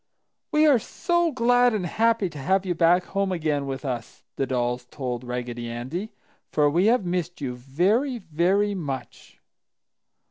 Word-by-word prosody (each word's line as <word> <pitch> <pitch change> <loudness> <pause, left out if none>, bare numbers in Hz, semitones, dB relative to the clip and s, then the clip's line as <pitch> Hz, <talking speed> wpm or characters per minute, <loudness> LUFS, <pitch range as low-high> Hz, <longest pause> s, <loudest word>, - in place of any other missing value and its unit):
"We 305 0 +4
are 285 -6 +6
so 345 +8 0
glad 245 -2 +3
and 190 -4 -2
happy 225 +2 +2
to 150 - -8
have 190 +8 +1
you 180 - 0
back 175 +2 +4
home 195 -1 -1
again 155 -5 -1
with 135 +2 -5
us!" 120 -4 -5
the 135 - -1
dolls 125 -1 -1
told 125 -3 -4
Raggedy 120 -1 -4
Andy. 130 - -5 0.4
"For 150 -1 +3
we 175 +6 +3
have 230 -4 +3
missed 175 0 -2
you 135 -4 -3
very, 190 - +1
very 190 +3 +1
much!" 140 -9 -6
175 Hz, 155 wpm, -25 LUFS, 135-210 Hz, 0.4 s, are